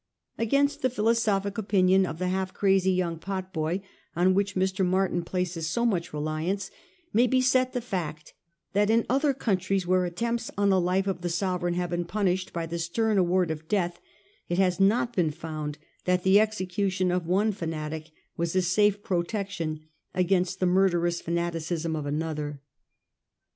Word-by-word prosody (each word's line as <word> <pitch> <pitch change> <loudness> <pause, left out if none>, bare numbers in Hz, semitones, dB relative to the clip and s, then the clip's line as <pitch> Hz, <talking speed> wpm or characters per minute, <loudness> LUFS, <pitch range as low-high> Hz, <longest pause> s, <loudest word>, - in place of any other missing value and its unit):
Against 280 +5 +2
the 255 - +2
philosophic 215 -3 +1
opinion 190 -2 +3
of 160 - -5
the 180 +1 -1
half 185 0 -2
crazy 190 -1 +3
young 175 -3 -1
potboy 185 -2 -3 0.3
on 180 +2 +4
which 200 +1 0
Mr. 190 0 +1
Martin 185 -1 +1
places 170 -2 -2
so 235 +4 0
much 185 -8 0
reliance, 155 +6 -2 0.4
may 240 +3 +4
be 260 +1 +3
set 255 0 +2
the 245 - -1
fact, 165 -9 -5 0.4
that 205 +1 +3
in 225 +1 +3
other 275 +3 +3
countries 195 -7 0
where 185 0 +2
attempts 230 +7 -2
on 200 0 +3
the 190 -1 +4
life 185 +2 +1
of 190 -3 -2
the 175 - -2
sove 180 +1 -1
• - - -17
reign 175 0 0
have 175 -1 -2
been 175 0 -1
punished 185 0 -1
by 170 -1 -3
the 170 +1 -4
stern 205 +5 +1
award 180 -1 +2
of 160 0 -6
death, 175 -2 0 0.5
it 175 - 0
has 185 -1 +2
not 235 +5 +2
been 175 -4 +2
found 155 -1 -5 0.3
that 180 0 +2
the 190 +2 +6
execution 190 -3 0
of 180 -2 -1
one 200 +5 +2
fanatic 160 -3 -5 0.3
was 170 +1 -2
a 185 - +3
safe 205 +3 +2
protection 175 -3 -2 0.3
against 185 0 +1
the 185 - +2
murderous 175 -2 +2
fana 170 +1 -1
ticism 165 0 -2
of 150 -2 -4
another. 150 -1 -3
185 Hz, 175 wpm, -27 LUFS, 170-200 Hz, 0.5 s, the